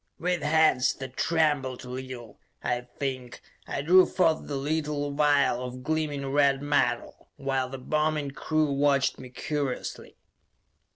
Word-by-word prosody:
With 180 -1 -1
hands 150 -4 +3
that 130 -1 -8
trembled 145 -6 0
a - - -9
little, 125 -4 -8 0.2
I 125 0 -2
think, 130 -3 -4 0.3
I 140 - -3
drew 185 +4 +6
forth 165 -4 +1
the 145 - -3
little 145 0 -1
vial 145 -4 +3
of 125 0 -7
gleaming 150 -1 -1
red 140 0 +3
metal, 145 -5 0
while 135 -2 -1
the 135 - -6
bombing 150 +1 -1
crew 155 +1 0
watched 140 -1 +2
me 130 - -9
curiously. 140 0 -4
140 Hz, 135 wpm, -27 LUFS, 130-150 Hz, 0.3 s, drew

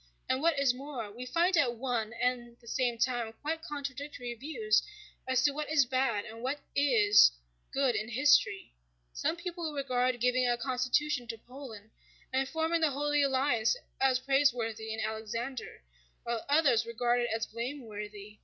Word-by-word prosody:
And 260 +1 0
what 330 -2 +2
is 275 -3 +3
more, 255 -5 -6
we 245 +4 -8
find 345 +6 +2
at 260 -8 +2
one 235 -3 -2
and 240 -1 -2
the 235 - -19
same 245 -1 0
time 235 -2 0
quite 320 +2 -2
contradictory 280 -5 -5
views 235 -4 +1 0.5
as 260 0 +2
to 290 - +4
what 295 +1 -4
is 300 -4 +4
bad 245 -5 0
and 225 0 -9
what 265 +4 -2 0.2
is 220 - +6 0.4
good 270 -3 +2
in 215 +1 -2
history: 265 - +3 0.4
some 320 - -1
people 345 -2 -4
regard 255 -3 0
giving 250 +1 +2
a 240 - +2
constitution 255 +1 0
to 230 0 -5
Poland 225 -3 -11 0.4
and 265 +1 +1
forming 325 +1 0
the 315 - +4
Holy 290 +1 +1
Alliance 265 - +2 0.2
as 265 -1 +4
praiseworthy 245 -5 +1
in 220 - -4
Alexander, 225 - -4 0.4
while 235 -1 -2
others 285 -7 +4
regard 240 +1 0
it 240 - -1
as 225 0 -1
blameworthy. 215 -4 -7
250 Hz, 160 wpm, -31 LUFS, 230-280 Hz, 0.5 s, is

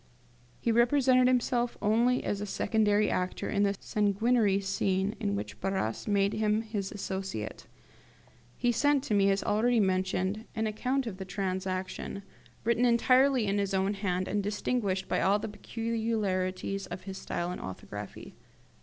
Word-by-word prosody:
He 235 - +1
represented 255 +2 +4
himself 245 -1 +1
only 235 +4 +2
as 205 0 -2
secondary 210 0 +2
actor 180 0 -2
in 200 - +1
this 200 -1 +2
sanguinary 210 0 +2
scene 195 0 0
in 100 - -1
which 105 +1 -6
Barras 190 - -2
made 200 -1 +2
him 215 0 +1
his 210 -3 -4
associate. 190 - -5 0.9
He 245 -1 +2
sent 285 +3 +2
to 225 - -2
me, 200 -1 +4
as 195 0 +1
already 230 +3 +2
mentioned, 190 +2 0
an 220 0 0
account 250 +5 -1
of 210 -5 -5
the 190 - -6
transaction, 190 0 -3 0.4
written 235 +1 +2
entirely 255 +1 +4
in 200 0 +1
his 200 -1 0
own 190 +2 +1
hand, 185 -2 -1
and 205 +1 0
distinguished 205 -1 -1
by - - 0
all 195 +2 +4
the 210 - -4
peculiarities 205 -4 -2
of 180 +1 -7
his 190 0 -7
style 175 +1 -3
and 180 - -6
orthography. 105 +2 -8
205 Hz, 150 wpm, -29 LUFS, 190-230 Hz, 0.9 s, represented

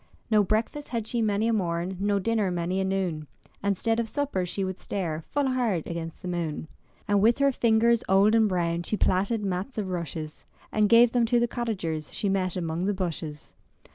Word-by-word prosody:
No 210 -1 +5
breakfast 225 +8 -1
had 230 -3 -2
she 235 +1 -1
many 215 0 +1
a 230 - +2
morn. 175 -2 -1
No 200 0 +1
dinner 215 0 +1
many 175 +1 -1
a - - +1
noon, 185 -5 -2 0.3
And 200 -1 0
'stead 225 +3 0
of 230 -1 -2
supper 275 -11 -1
she 195 +3 -2
would 190 0 -4
stare 165 -5 -3
Full 285 -2 0
hard 230 -10 0
against 165 +1 -6
the - - -4
moon. 170 -3 -3 0.4
And 205 -1 +3
with 230 +3 +4
her 280 0 +3
fingers 235 -1 +3
old 195 +3 +5
and 220 -2 +4
brown 170 -2 0
She 210 +5 -2
plaited 200 +4 +1
mats 190 +7 -3
of 200 -3 -2
rushes. 160 -3 -5 0.3
And 210 -1 +2
gave 235 +1 +7
them 235 -1 +2
to 240 +1 +3
the 240 - +2
cottagers 190 -11 -3
She 205 - 0
met 185 -2 0
among 170 0 -2
the 205 0 0
bushes. 160 -5 -5
195 Hz, 200 wpm, -27 LUFS, 175-225 Hz, 0.4 s, gave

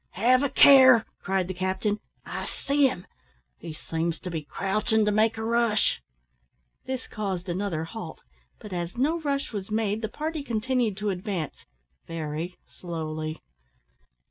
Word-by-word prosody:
"Have 250 +6 +4
a 285 - +1
care," 260 -5 +8 0.2
cried 190 -2 0
the 185 - -3
captain; 190 +3 -1 0.3
"I - - -4
see 280 0 +2
him. 180 -8 -5 0.5
He - - -7
seems 165 +2 -3
to 180 - -5
be 160 -2 -2
crouchin' 210 +7 0
to 210 - +2
make 220 +2 +2
a 220 - -3
rush." 230 -2 +2 0.8
This 260 -1 -4
caused 195 -3 -3
another 175 -2 -2
halt; 170 -2 -7 0.4
but 210 - -9
as 175 +3 -4
no 305 +7 +2
rush 280 -4 -2
was 200 -1 -4
made, 215 0 0
the 220 - -2
party 310 +5 -3
continued 240 -3 0
to 210 -1 -1
advance 180 -4 -4 0.4
very 165 +2 -4 0.2
slowly. 155 -2 -4
205 Hz, 145 wpm, -27 LUFS, 175-235 Hz, 0.8 s, care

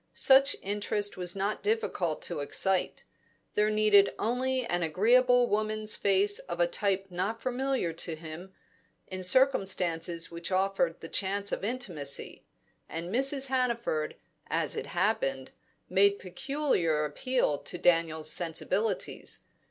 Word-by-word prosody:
Such 270 +1 +6
interest 205 +1 -1
was 180 -1 -3
not 200 +2 -2
difficult 410 - -1
to - - -4
excite; 185 +6 0 0.5
there 210 0 +2
needed 215 -2 +4
only 255 +2 -1
an 175 -6 -1
agreeable 245 +9 +3
woman's 215 0 0
face 200 +1 +2
of 175 - -7
a 175 - +5
type 195 +2 0
not 190 +6 -2
familiar 255 -8 -1
to 165 0 -3
him, 160 +4 -9 0.5
in 185 0 -6
circumstances 180 -8 +1
which 170 +2 -5
offered 185 -3 0
the - - -7
chance 200 +3 -1
of - - -3
intimacy. 195 - -3 0.5
And 170 +4 -5
Mrs. 270 +2 +2
Hannaford, 235 -12 -1 0.3
as 160 -3 0
it - - -4
happened, 170 -9 -1 0.4
made 200 +1 +3
peculiar 185 - -1
appeal 245 - -1
to - - -8
Daniel's 165 -3 +2
sensibilities. 185 +4 -2
195 Hz, 125 wpm, -29 LUFS, 170-235 Hz, 0.5 s, Such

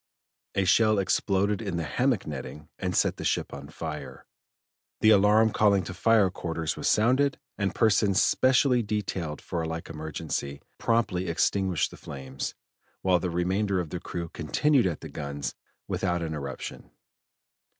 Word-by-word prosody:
A 95 - +2
shell 110 +2 +4
exploded 100 +2 +1
in 95 -6 -3
the 85 - -1
hammock 125 - 0
netting 75 +1 -7
and - - -2
set - - +2
the - - -6
ship - - -1
on 70 0 -8
fire; 80 -1 -7 0.7
the 110 - +6
alarm 105 +2 +5
calling 100 -3 +3
to 95 - -6
fire 105 0 +3
quarters 80 -3 -3
was - - -3
sounded, 130 +6 +3 0.2
and 100 -2 -2
persons 100 -3 +3
specially 130 -1 +4
detailed 95 -7 -3
for 85 - -3
a 80 - -2
like 80 0 -5
emergency, 75 -2 -4 0.2
promptly 105 -6 +1
extinguished 95 0 +1
the - - -11
flames, 65 -1 -6 0.5
while 90 -2 +4
the 90 - -2
remainder 95 +3 0
of 85 -3 -4
the 90 - -3
crew 85 -1 -5
continued 120 - +2
at 85 -4 -3
the - - -7
guns 70 -2 -4 0.3
without 90 -2 -1
interruption. 75 -4 -6
95 Hz, 150 wpm, -27 LUFS, 80-105 Hz, 0.7 s, the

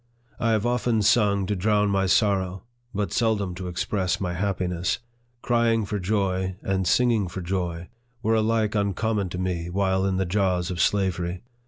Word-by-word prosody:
I 115 -1 +2
have 110 0 +1
often 120 -2 +1
sung 100 -2 +3
to 105 +2 -1
drown 105 +1 +2
my 95 -1 +1
sor 100 +1 +3
row, 95 0 -6 0.3
but 105 -2 -2
seldom 105 -5 +1
to 90 +1 -6
express 90 +1 -1
my 90 -3 -2
happiness. 90 -1 -1 0.5
Crying 115 -2 +2
for 105 0 -3
joy, 95 -1 0
and 95 -1 0
singing 115 -3 +3
for 95 +2 -6
joy, 85 -1 -3 0.4
were 110 - +2
alike 110 -1 +1
uncommon 100 0 0
to 90 - -5
me 90 -2 -2
while 95 0 +1
in 95 -1 0
the 95 - +1
jaws 90 -1 0
of 85 - -2
slavery. 90 -3 0
95 Hz, 170 wpm, -25 LUFS, 90-105 Hz, 0.5 s, sung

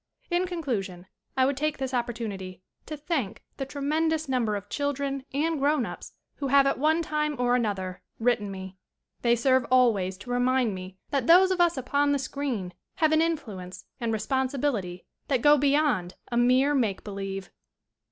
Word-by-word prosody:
In 355 +1 +1
conclusion 215 - -3 0.3
I 260 - +5
would 275 +1 +1
take 305 +2 -1
this 265 -1 -4
opportunity 215 -7 -4 0.2
to 305 - -5
thank 290 - -3
the 270 - -4
tremendous 310 +3 0
number 240 -5 0
of 205 0 -6
children 280 0 -2
and 310 +3 0
grown 285 -2 +2
ups - - -8 0.2
who 280 - -2
have 275 +1 +5
at 275 - +1
one 315 +3 +2
time 300 -1 -1
or 245 0 +2
an 240 -3 +1
other 185 -3 -4 0.2
written 230 -3 +1
me. 190 -1 -8 0.4
They 235 -1 +4
serve 260 +2 +3
always 215 -8 +3
to 245 +5 -8
re 245 - +1
mind 250 -3 +2
me 185 0 -8
that 275 -4 0
those 370 +3 +7
of 365 -1 +1
us 345 -3 +3
upon 285 +3 +1
the - - +2
screen 260 -9 -3 0.2
have 315 -1 +2
an 315 0 +4
influence 200 - -3
and 235 -2 -1
responsibility 245 -5 -1 0.2
that 260 -5 0
go 295 0 +7
beyond 280 - +1 0.2
a - - -1
mere 255 +4 +4
make 225 -8 0
believe. 195 -1 -5
255 Hz, 175 wpm, -27 LUFS, 205-290 Hz, 0.4 s, those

